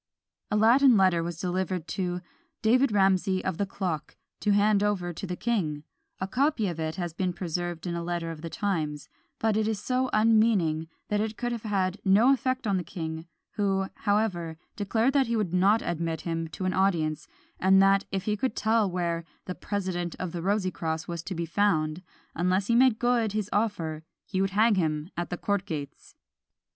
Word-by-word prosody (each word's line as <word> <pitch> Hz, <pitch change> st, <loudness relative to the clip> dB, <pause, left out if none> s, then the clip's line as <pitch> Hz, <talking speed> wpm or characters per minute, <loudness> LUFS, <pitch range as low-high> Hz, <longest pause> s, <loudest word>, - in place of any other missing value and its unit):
A -, -, 0 dB
Latin 240 Hz, +3 st, +6 dB
letter 185 Hz, -3 st, +4 dB
was 170 Hz, -1 st, -5 dB
delivered 180 Hz, -2 st, -2 dB
to 180 Hz, 0 st, -2 dB, 0.4 s
"David 250 Hz, +3 st, +4 dB
Ramsey 190 Hz, -1 st, +2 dB
of 185 Hz, -3 st, -2 dB
the 200 Hz, -, 0 dB
clock," 180 Hz, -6 st, -4 dB, 0.2 s
to 210 Hz, -, -1 dB
hand 205 Hz, 0 st, +4 dB
over 190 Hz, -4 st, 0 dB
to 195 Hz, -, -6 dB
the 180 Hz, -, -3 dB
king: 175 Hz, -11 st, -1 dB, 0.4 s
a 190 Hz, -, -2 dB
copy 260 Hz, 0 st, +1 dB
of 170 Hz, -3 st, -4 dB
it 160 Hz, 0 st, -2 dB
has 175 Hz, -3 st, -4 dB
been 180 Hz, +1 st, -1 dB
preserved 175 Hz, -1 st, -4 dB
in 175 Hz, -, -2 dB
a 170 Hz, -, -2 dB
letter 170 Hz, -1 st, -3 dB
of 155 Hz, -2 st, -9 dB
the 165 Hz, -, -5 dB
times; 160 Hz, -7 st, -2 dB, 0.3 s
but 220 Hz, -2 st, +1 dB
it 215 Hz, 0 st, +1 dB
is 220 Hz, -2 st, -1 dB
so 255 Hz, +3 st, 0 dB
unmeaning, 215 Hz, -8 st, +3 dB, 0.2 s
that 210 Hz, 0 st, +1 dB
it 220 Hz, 0 st, -3 dB
could 240 Hz, 0 st, -2 dB
have 235 Hz, -2 st, -3 dB
had 195 Hz, -3 st, -1 dB
no 215 Hz, +7 st, +5 dB
effect 260 Hz, -1 st, -1 dB
on 200 Hz, -3 st, +1 dB
the 180 Hz, -, -2 dB
king, 160 Hz, -1 st, -6 dB, 0.2 s
who, 195 Hz, -2 st, 0 dB
however, 195 Hz, -6 st, 0 dB, 0.2 s
declared 225 Hz, +5 st, +1 dB
that 275 Hz, -3 st, +3 dB
he 235 Hz, -, 0 dB
would 205 Hz, -6 st, -1 dB
not 200 Hz, +5 st, +4 dB
admit 165 Hz, -1 st, -2 dB
him 165 Hz, -1 st, -3 dB
to 160 Hz, +4 st, -6 dB
an 185 Hz, -, +1 dB
audience, 165 Hz, -6 st, +1 dB, 0.3 s
and 190 Hz, +1 st, +5 dB
that 195 Hz, 0 st, +5 dB
if 195 Hz, -1 st, -2 dB
he 210 Hz, 0 st, 0 dB
could 225 Hz, +2 st, -2 dB
tell 220 Hz, -2 st, +2 dB
where 170 Hz, -2 st, -1 dB, 0.2 s
"the 180 Hz, -, -4 dB
President 180 Hz, -4 st, -3 dB
of 185 Hz, -2 st, -4 dB
the 170 Hz, -, -4 dB
Rosycross" 180 Hz, -5 st, -1 dB
was 170 Hz, -1 st, -4 dB
to 185 Hz, +2 st, -6 dB
be 170 Hz, 0 st, -2 dB
found, 165 Hz, -3 st, +1 dB, 0.3 s
unless 185 Hz, +3 st, +1 dB
he 235 Hz, -, +1 dB
made 250 Hz, -2 st, +5 dB
good 240 Hz, -3 st, +1 dB
his 210 Hz, -2 st, -2 dB
offer, 170 Hz, -8 st, -1 dB, 0.2 s
he 190 Hz, -2 st, -1 dB
would 195 Hz, -, +1 dB
hang 215 Hz, +3 st, +4 dB
him 160 Hz, -2 st, -1 dB
at 175 Hz, 0 st, -3 dB
the 175 Hz, -, -3 dB
court 200 Hz, 0 st, -1 dB
gates. 145 Hz, -4 st, -7 dB
190 Hz, 195 wpm, -27 LUFS, 170-215 Hz, 0.4 s, Latin